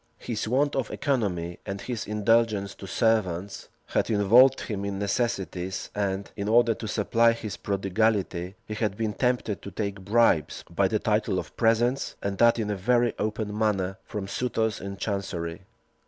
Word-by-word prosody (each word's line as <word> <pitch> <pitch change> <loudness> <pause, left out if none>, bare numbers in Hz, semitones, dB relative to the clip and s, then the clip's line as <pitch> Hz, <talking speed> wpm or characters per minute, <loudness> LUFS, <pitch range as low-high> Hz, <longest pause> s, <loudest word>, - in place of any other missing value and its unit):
His 110 -2 -4
want 140 +5 +1
of 130 -5 -1
economy, 90 - -1
and 100 -1 -5
his 120 +1 -4
indulgence 105 -1 +2
to 95 - -10
servants, 100 -4 0 0.2
had - - 0
involved 115 +6 +5
him 100 -3 -4
in 100 -1 -3
necessities; 95 -4 -2
and, 100 -1 -2
in 100 -1 -3
order 115 +1 +5
to 110 - -7
supply 115 +2 +3
his 110 -3 -6
prodigality, 100 -2 0
he 110 - -5
had 105 -2 -1
been 110 -2 -1
tempted 125 -4 0
to - - -7
take 100 +1 -4
bribes, 105 -5 +2
by - - +2
the - - +1
title - - 0
of - - -5
presents, 120 +4 +1
and 100 -1 -2
that 120 0 +5
in 105 -2 -1
a - - 0
very 120 +4 +2
open 105 -1 -2
manner, 95 -3 0
from 105 -3 -5
suitors 110 0 -1
in 100 0 -6
chancery. 95 -3 -4
105 Hz, 165 wpm, -26 LUFS, 100-115 Hz, 0.2 s, involved